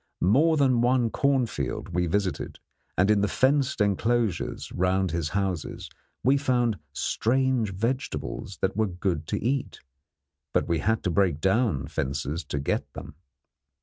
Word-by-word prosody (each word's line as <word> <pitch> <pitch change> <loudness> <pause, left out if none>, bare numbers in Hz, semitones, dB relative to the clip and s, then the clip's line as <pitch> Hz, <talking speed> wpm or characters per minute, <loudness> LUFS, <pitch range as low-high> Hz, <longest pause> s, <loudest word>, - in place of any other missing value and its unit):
More 150 - +4
than 130 -4 +3
one 120 -1 +2
cornfield 120 - 0
we 90 0 0
visited, 95 +1 -2 0.4
and 95 +3 +4
in 105 -1 +3
the 105 - +2
fenced 135 +3 +2
enclosures 105 0 0
round 95 0 +1
his 85 -2 -1
houses 95 -2 -3 0.3
we 135 +4 +4
found 120 - +1
strange 125 - +1
vegetables 115 -3 -3
that 95 0 0
were 110 0 +2
good 90 -4 -2
to - - -1
eat; 130 +4 -2 0.7
but - - +1
we 85 -1 +1
had 110 +1 0
to 90 - 0
break 90 -5 +2
down 95 - +1
fences 70 +4 -3
to - - -4
get 70 - -2
them. - - -8
100 Hz, 145 wpm, -26 LUFS, 90-125 Hz, 0.7 s, More